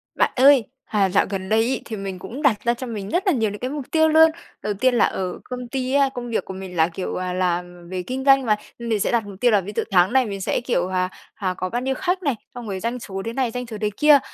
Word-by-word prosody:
Bạn - - +2
ơi, 265 -2 +6 0.2
à, 200 -3 +1
dạo 195 +2 +3
gần 190 -1 -4
đây 220 +1 +4
ấy 250 +3 0
thì 225 - -5
mình 195 -2 -5
cũng 225 +10 -7
đặt 250 -9 +2
ra 235 - +3
cho 250 +2 -6
mình 205 -4 -5
rất 370 - 0
là 375 - +5
nhiều 225 -5 +1
những 205 0 -7
cái 255 - -3
mục 285 -1 -5
tiêu 315 -1 +4
luôn. 320 +1 +7 0.3
Đầu 210 - -1
tiên 250 +5 +2
là - - +5
ở 185 -1 -3
công 250 -1 -6
ty 260 +1 -2
á, 280 -1 +4
công 245 -1 -5
việc 230 - -1
của - - -7
mình 190 -1 -8
là, 160 -1 +4
kiểu, 180 +2 -5
à, 185 0 -2
làm 175 -1 -2
về 185 -1 -3
kinh 260 +4 -4
doanh 270 -2 +6
mà, 215 - +3 0.2
mình 230 -2 -1
sẽ - - +1
đặt 230 -3 +1
mục 195 -2 -10
tiêu 245 - +5
là 205 -3 +4
ví 200 - -7
dụ - - +1
tháng 185 +2 +4
này 265 -1 +4
mình 200 -3 -5
sẽ, 190 - 0
kiểu, 185 -8 0
à, 185 0 0 0.2
à, 190 -4 -2
có 185 0 -2
bao 240 - -2
nhiêu 265 +1 -1
khách 370 +4 -1
này, 280 -6 +1 0.2
xong 240 -2 -7
rồi 190 - -3
doanh 235 +4 -3
số 195 -4 -6
thế 230 - -3
này, 255 -2 0
doanh 250 +1 -4
số 220 -2 -6
thế 210 - +1
kia. 295 -2 +7
225 Hz, 295 wpm, -22 LUFS, 190-255 Hz, 0.3 s, luôn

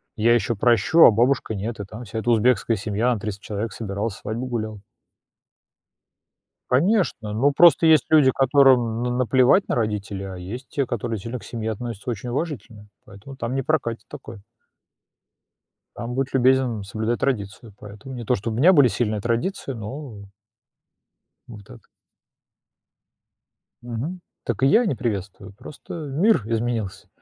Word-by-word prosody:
Я 115 +2 +3
ещё 120 -1 +1
прощу, 120 - +3
а - - +9
бабушка 120 0 +1
нет". 110 +4 -5
И 100 - -3
там 110 +4 -10
вся 110 +2 -5
эта 120 - -2
узбекская 115 0 +2
семья, 105 +5 0
на 110 - -4
300 100 -1 -6
человек 110 +2 -4
собиралась, 100 0 -4
свадьбу 115 +4 -5
гуляла. 110 -4 -4 1.9
Конечно, 150 - +1
ну, 140 +6 +2
просто 165 0 +6
есть 155 -2 +5
люди, 150 -4 +5
которым 130 -4 +3
на 125 - -1
наплевать 125 - +3
на - - 0
родителей, 105 -3 -3
а - - -8
есть 110 +9 -8
те, 140 -3 -1
которые 115 -1 -3
сильно 115 +6 -6
к - - -15
семье 110 -2 -4
относятся 115 0 -7
очень 120 +2 -5
уважительно, 115 - -5 0.2
поэтому 105 +6 -13
там 120 0 -4
не 135 - -1
прокатит 115 -8 -2
такое. 110 -2 -10 1.6
Там 120 +1 -5
будь 135 +1 -2
любезен 130 -4 +2
соблюдай 110 +4 -2
традицию, 110 -3 -3
поэтому 105 +6 -10
не 120 -2 -6
то, 125 - +1
чтобы 110 +2 -3
у - - -3
меня 175 +7 +6
были 145 -7 +6
сильные 110 -3 -1
традиции, 120 - -2
ну 110 -2 -8 1.2
вот 105 -4 -12
так. - - -16 2.0
Мгм. 125 +10 -5 0.2
Так 120 +1 -3
и - - +5
я 225 - +4
не 140 - 0
приветствую, 105 -4 -5
просто 140 - -11
мир 160 - +1
изменился, 115 -3 -3
120 Hz, 150 wpm, -23 LUFS, 105-130 Hz, 2.0 s, а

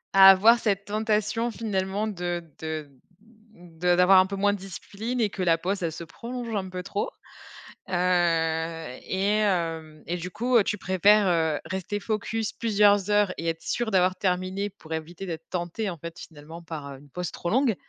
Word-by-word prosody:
à 195 0 +10
avoir 220 +5 +7
cette 200 -3 0
tentation, 215 +2 0
finalement 205 -2 -2
de 175 -4 -3 0.2
de 155 -2 -5 0.7
de 175 0 -1
d'avoir 180 +2 +7
un 185 - +4
peu 195 - -4
moins 205 +1 +2
de 205 - -5
discipline 205 +5 -5
et 215 - +2
que - - -5
la 170 -2 +3
pause, 190 +4 -2
elle 165 - -1
se 170 +1 -7
prolonge 235 +6 -6
un 190 -2 -2
peu 180 0 -5
trop. 200 +2 -2 0.8
Heu, 165 -5 0
et 190 +1 -1
hem, 165 -6 -1
et 175 - -1
du 180 +1 -6
coup, 245 +5 -1
heu, 220 - +5
tu 210 - -2
préfères, 195 +2 +4
heu, 160 -4 +1
rester 190 +4 -3
focus 220 +1 -2
plusieurs 205 -3 +3
heures 205 -2 +3
et 165 - -4
être 165 0 -4
sûr 235 -2 -2
d'avoir 185 -1 +3
terminé 185 +2 -1
pour 165 -5 -10
éviter 165 +4 -5
d'être 165 -2 -7
tenté, 180 +4 -3
en 175 - -6
fait, 170 +2 -8
finalement, 160 +2 -11
par 155 -4 -7
une 140 +2 -16
pause 180 +3 -4
trop 175 - -4
longue 250 -1 +2
185 Hz, 185 wpm, -26 LUFS, 170-205 Hz, 0.8 s, à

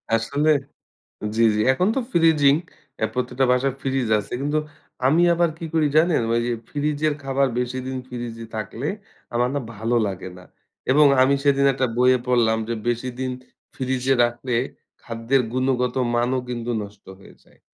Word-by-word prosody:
আসলে, 140 +7 0 0.9
জ্বি, 115 - +3
জ্বি। 105 - +1
এখন 180 +8 +1
তো - - +2
ফ্রিজিং, 155 -4 +4 0.5
এ - - +5
প্রত্যেকটা 125 +1 0
বাসায় 130 +1 +1
ফ্রিজ 135 -3 -1
আছে। 100 - -8
কিন্তু 145 +2 0 0.5
আমি 160 +5 +4
আবার 170 -1 +2
কি 165 - -6
করি 155 -2 +3
জানেন! 160 -4 +4
ওই 115 - +2
যে, 120 - 0 0.2
ফ্রিজের 150 +1 0
খাবার 135 0 +1
বেশিদিন 130 +1 -3
ফ্রিজে 120 -2 -6
থাকলে 115 +5 -4 0.5
আমার 120 +1 +1
না 145 - +1 0.2
ভালো 115 +4 -1
লাগে 95 -1 -6
না। 90 - -13 0.5
এবং 150 +2 +6 0.2
আমি 140 +2 +4
সেদিন 140 -1 +3
একটা 130 -1 0
বইয়ে 125 +1 +4
পড়লাম 115 -3 +3
যে, 120 - -1
বেশিদিন 125 +2 -2 0.4
ফ্রিজে 130 0 0
রাখলে, 120 +1 -1 0.5
খাদ্যের 115 +3 0
গুণগত 130 -1 0 0.2
মানও 125 +2 +1
কিন্তু 120 0 -3
নষ্ট 100 0 -13
হয়ে - - -16
যায়। - - -26
130 Hz, 155 wpm, -23 LUFS, 120-140 Hz, 0.9 s, এবং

